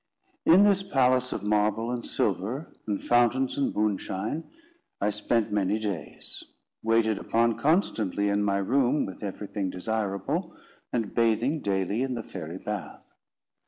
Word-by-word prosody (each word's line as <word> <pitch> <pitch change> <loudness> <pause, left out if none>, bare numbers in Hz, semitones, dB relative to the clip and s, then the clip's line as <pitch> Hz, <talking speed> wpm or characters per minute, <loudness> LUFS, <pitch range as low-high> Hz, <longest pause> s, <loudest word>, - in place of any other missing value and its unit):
In 180 +5 +8
this 200 -2 +4
palace 130 -8 +2
of 100 - -3
marble 105 +2 +1
and 120 -1 -3
silver, 120 - -2
and 105 -2 -2
fountains 120 +2 +3
and 140 - +1
moonshine, 105 +6 -1 0.5
I 105 +1 +1
spent 105 +1 0
many 105 0 +1
days; 100 -9 -5 0.4
waited 110 -1 +2
upon 115 0 +1
constantly 110 - +1
in 100 0 +2
my 100 -1 +1
room 130 +7 +2
with 95 - -8
everything 100 -1 -3
desirable, 110 - -2 0.4
and 115 -4 -1
bathing 115 +6 +2
daily 100 +3 0
in 130 -1 -1
the 115 - -4
fairy 85 -3 -7
bath. 105 +1 -6
110 Hz, 135 wpm, -27 LUFS, 100-125 Hz, 0.5 s, In